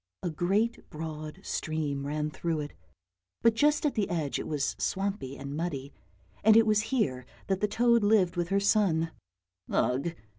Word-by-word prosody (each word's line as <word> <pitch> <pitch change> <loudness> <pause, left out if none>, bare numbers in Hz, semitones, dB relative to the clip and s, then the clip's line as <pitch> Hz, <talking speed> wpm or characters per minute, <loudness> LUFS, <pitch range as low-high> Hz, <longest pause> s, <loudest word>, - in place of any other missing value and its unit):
A 175 - -1
great 200 +9 0
broad 155 +2 -6
stream 145 -4 -2
ran 150 +1 -2
through 165 -1 -2
it, 145 - -6 0.7
but 230 - +6
just 295 +6 +2
at 290 - +2
the 210 -4 0
edge 155 -5 -1
it - - -5
was 150 -3 -1
swampy 195 -9 -2
and 140 +1 -6
muddy, 150 -4 -4 0.5
and 220 +1 +7
it 225 - +6
was 215 -1 +3
here 135 - 0 0.2
that 190 -1 0
the 210 - +3
toad 235 +1 +3
lived 200 -4 +3
with 175 -1 -1
her 195 0 +3
son. 195 -6 +2 0.6
Ugh! 140 +7 0
175 Hz, 170 wpm, -29 LUFS, 150-210 Hz, 0.7 s, and